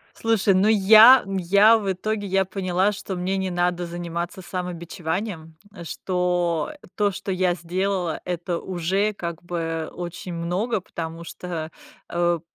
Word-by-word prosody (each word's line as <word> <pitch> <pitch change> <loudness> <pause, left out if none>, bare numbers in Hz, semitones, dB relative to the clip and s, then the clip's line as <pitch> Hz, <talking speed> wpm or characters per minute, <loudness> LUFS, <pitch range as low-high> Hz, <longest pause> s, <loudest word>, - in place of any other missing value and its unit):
Слушай, 225 -3 +2
ну, 190 +3 +3
я 220 +4 +8
я 195 +4 +4
в 200 -3 -1
итоге, 205 +2 -3
я 195 0 +2
поняла, 185 +1 0
что 195 -1 -5
мне 185 +2 -1
не 190 0 -1
надо 175 0 0
заниматься 170 +2 -5
самобичеванием, 175 -1 -5 0.3
что 180 - -1 0.2
то, 205 -1 +2
что 195 +1 -5
я 185 -1 +1
сделала,- 180 0 -2
это 175 -1 -3
уже, 190 +4 -1
как 170 -4 -6
бы, 165 -2 -3
очень 175 +1 -6
много, 180 +6 -1
потому 165 -1 -6
что, 165 -2 -6 0.4
э, 175 0 +1
180 Hz, 135 wpm, -23 LUFS, 170-195 Hz, 0.4 s, я